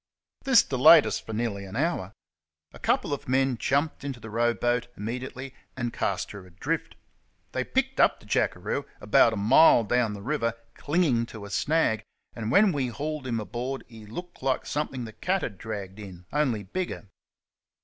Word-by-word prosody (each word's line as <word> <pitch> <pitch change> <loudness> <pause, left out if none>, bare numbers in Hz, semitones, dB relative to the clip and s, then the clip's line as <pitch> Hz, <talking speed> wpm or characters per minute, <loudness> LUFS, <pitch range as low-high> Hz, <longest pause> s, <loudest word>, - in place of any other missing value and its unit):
This 265 -5 +6
delayed 145 +4 +7
us - - -1
for - - -9
nearly 110 -3 -2
an 95 +1 -9
hour. 130 - -1 0.6
A. - - -12
couple - - +1
of 140 - -5
men 135 0 +2
jumped 140 +7 0
into 135 -3 -5
the 115 -1 -9
row 120 +2 +2
boat 120 0 0
immediately 125 +4 -5 0.2
and 120 -2 -2
cast - - -2
her 100 - -9
adrift. 90 0 -3 0.6
They - - -1
picked - - -1
up - - +4
the - - -18
jackeroo - - -1
about 115 - +5
a - - -3
mile 115 +4 +6
down 115 0 +1
the 100 - -9
river, 115 -3 -1 0.2
clinging 145 -7 +1
to 110 -3 -9
a 100 - -10
snag, 145 -5 +1 0.3
and 110 -2 -4
when 200 - +5
we 140 -5 -1
hauled 145 +4 -4
him 115 -2 -1
aboard 125 +5 -4
he 110 -3 -13
looked 175 - -8
like 130 -1 0
something 135 -4 -3
the 110 - -9
cat 190 - -1
had 100 - -5
draggecfcfn, 100 -4 -7
only 130 -8 +1
bigger. 110 - -4
120 Hz, 175 wpm, -27 LUFS, 110-140 Hz, 0.6 s, delayed